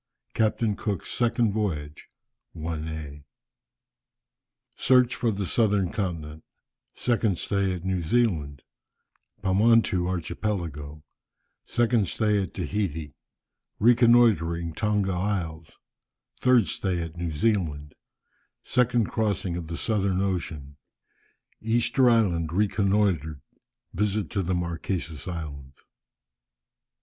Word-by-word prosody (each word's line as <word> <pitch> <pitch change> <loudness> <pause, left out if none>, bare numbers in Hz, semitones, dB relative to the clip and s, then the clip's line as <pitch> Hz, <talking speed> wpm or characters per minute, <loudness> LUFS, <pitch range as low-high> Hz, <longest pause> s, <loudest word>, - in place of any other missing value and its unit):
CAPTAIN 110 -1 +1
COOK'S 100 -5 -3
SECOND 120 -3 +1
VOYAGE. 75 -9 -3 0.5
I. 80 -2 -5 1.5
Search 125 -1 +4
for 120 - 0
the 100 -2 -2
Southern 100 -3 +1
Continent 80 -7 -4 0.5
Second 115 -6 +1
stay 100 -1 0
at 85 - -8
New 95 -1 0
Zealand 80 - 0 0.8
Pomontou 95 -2 +3
Archipelago 85 -5 -4 0.6
Second 120 -4 +1
stay 105 +2 +1
at 95 -7 -6
Tahiti 80 -8 -3 0.6
Reconnoitring 110 -8 +4
Tonga 105 0 0
Isles 90 -4 -3 0.6
Third 125 -4 +4
stay 95 -2 -2
at 85 -1 -5
New 85 -1 -3
Zealand 75 -5 -1 0.7
Second 120 -2 +2
crossing 100 -5 -1
of 85 -2 -5
the 85 +1 -5
Southern 100 -4 0
Ocean 80 -7 -3 0.8
Easter 120 +3 +3
Island 90 -9 +2
reconnoitred 95 -6 +1 0.5
Visit 105 -2 -1
to 100 - 0
the 90 0 -1
Marquesas 85 -2 -3
Islands. 70 -6 -7
95 Hz, 95 wpm, -26 LUFS, 80-110 Hz, 1.5 s, Search